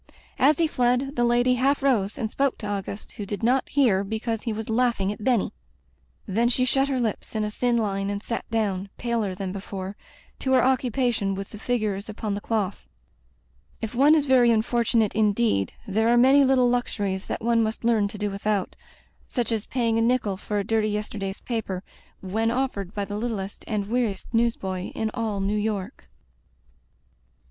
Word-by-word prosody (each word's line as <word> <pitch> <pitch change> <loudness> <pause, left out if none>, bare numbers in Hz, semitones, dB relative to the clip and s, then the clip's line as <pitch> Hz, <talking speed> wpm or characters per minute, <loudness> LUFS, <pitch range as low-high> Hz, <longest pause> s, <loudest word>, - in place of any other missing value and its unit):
As 280 +3 +5
he 335 - +3
fled, 255 0 +1
the 240 - +2
lady 240 +1 +3
half 270 +3 +1
rose 225 -7 +2
and 220 - -1
spoke 275 +4 0
to 210 - -6
Auguste, 200 0 -4
who 205 - -6
did 205 +2 -5
not 255 +3 +2
hear 235 -9 +3
because 220 +2 -3
he 230 - -2
was 220 0 -4
laughing 225 -4 +1
at 210 - -7
Benny. 240 -4 +1 0.7
Then 230 +5 +1
she 255 +1 +2
shut 270 +2 +2
her 270 -2 0
lips 225 -1 -3
in 215 - +1
a 210 - -2
thin 240 +2 +1
line 195 -3 -1
and 205 +1 -3
sat 230 - -4
down, 200 -4 -1
paler 230 -5 -1
than 190 -1 -4
before, 195 0 -6 0.4
to 265 - 0
her 255 - +5
occupation 245 -5 +1
with 195 0 -6
the 210 - -9
figures 215 -4 -1
upon 215 -1 -3
the 200 - -3
cloth. 205 -4 -2 0.9
If 225 - -4
one 280 +5 +6
is 300 -2 +2
very 255 -3 +5
unfortunate 230 -1 +2
indeed, 215 - +1
there 220 +3 +2
are 240 - +5
many 265 +3 +6
little 260 -2 +4
luxuries 205 -6 -1
that - - -4
one 230 0 +3
must 220 +1 -2
learn 225 -3 +3
to 205 - -9
do 205 0 -2
widiout 200 -1 -1 0.3
— - - -35
such 240 -2 +1
as 220 -2 -1
paying 230 -3 +1
a - - +2
nickel 230 -4 +1
for 205 +2 -4
a 200 - +1
dirty 220 +1 +1
yesterday's 205 -2 -4
paper, 210 -6 -3 0.4
when 220 +4 0
offered 230 -6 -2
by 205 -1 -1
the 205 +1 -5
littlest 215 -4 -4
and 210 -3 -1
weariest 230 -3 -1
newsboy 195 -6 0
in 220 -1 -1
all 220 -3 -2
New 200 +2 0
York. 210 -3 -3
220 Hz, 190 wpm, -25 LUFS, 200-245 Hz, 0.9 s, one